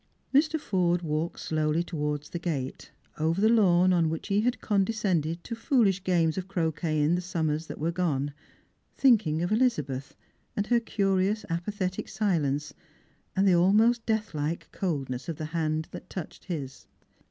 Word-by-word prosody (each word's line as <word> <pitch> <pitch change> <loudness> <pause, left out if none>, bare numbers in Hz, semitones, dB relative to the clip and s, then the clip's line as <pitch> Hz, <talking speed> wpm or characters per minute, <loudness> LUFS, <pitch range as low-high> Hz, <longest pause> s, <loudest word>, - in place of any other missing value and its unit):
Mr. 310 +3 +3
Forde 175 -7 +1
walked 155 +1 -2
slowly 155 +1 0
towards 150 -3 -3
the 170 - -3
gate, 145 -7 -4 0.3
over 160 +3 +1
the 215 - +4
lawn 185 -5 +5
on 170 -3 +3
which 160 +5 -4
he 200 +1 +3
had 245 +2 0
condescended 190 -6 0
to 235 - -6
foolish 225 -5 +2
games 170 -2 +2
of 185 - -6
croquet 160 -3 -1
in 150 +3 +3
the 180 - +1
summers 160 -3 -2
that - - -7
were 160 +3 -1
gone, 145 -5 -1 0.6
thinking 200 - +4
of 175 - -2
Elizabeth, 150 - 0 0.4
and 205 - +1
her 240 +2 +3
curious 200 -1 0
apathetic 185 +2 -3
silence, 150 -8 0 0.6
and 195 +1 +3
the 185 - +6
almost 215 +7 +4
deathlike 170 -8 -1
cold 155 -8 -2
ness 130 +5 -5
of 165 - -2
the 155 - -5
hand 155 -1 0
that - - -8
had - - -37
touched 180 -5 -7
his. 145 -7 -6
175 Hz, 165 wpm, -28 LUFS, 155-200 Hz, 0.6 s, the